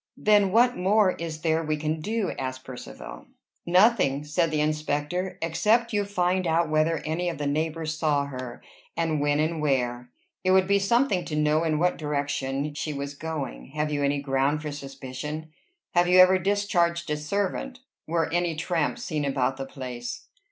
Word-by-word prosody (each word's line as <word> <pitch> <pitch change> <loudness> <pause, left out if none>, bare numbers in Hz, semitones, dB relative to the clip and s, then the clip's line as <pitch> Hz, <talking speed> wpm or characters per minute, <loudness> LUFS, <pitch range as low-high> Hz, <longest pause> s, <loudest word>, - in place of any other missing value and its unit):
"Then 205 -2 +4
what 245 +4 +4
more 195 +1 +3
is 165 -3 -6
there 160 0 +1
we 155 -1 -1
can 155 +1 -2
do?" 215 +2 -1
asked 130 0 -4
Percivale. - - -9 0.4
"Nothing," 180 - +4
said 155 +3 +1
the 155 -1 -1
inspector, 155 +4 -1
"except 220 +8 +2
you 205 -1 +1
find 185 -2 0
out 165 -1 +1
whether 155 +1 +1
any 170 +3 -1
of 170 - -5
the 145 - -3
neighbors 160 +2 -2
saw 145 -3 +2
her, 130 -3 -7 0.3
and 160 -3 0
when 145 0 +2
and 160 +1 0
where. 125 -4 0 0.3
It 185 0 +3
would 190 0 +5
be 200 0 +3
something 200 -1 +2
to 155 - -4
know 150 +1 +2
in 155 -2 +1
what 180 +3 +1
direction 145 -1 -2
she 150 +1 -3
was 140 0 -4
going. 145 - -5
Have 150 0 -1
you 145 -1 -1
any 140 0 +1
ground 140 +2 0
for 150 - -3
suspicion? 140 +2 -7 0.4
Have 175 0 +3
you 180 +1 +5
ever 185 +1 +7
discharged 175 -4 +1
a - - +2
servant? 200 - -3 0.3
Were 165 0 +1
any 175 -1 +1
tramps 165 +7 -1
seen 155 -3 -2
about 135 -1 0
the 135 0 -5
place?" 125 -3 -6
155 Hz, 175 wpm, -26 LUFS, 145-180 Hz, 0.4 s, ever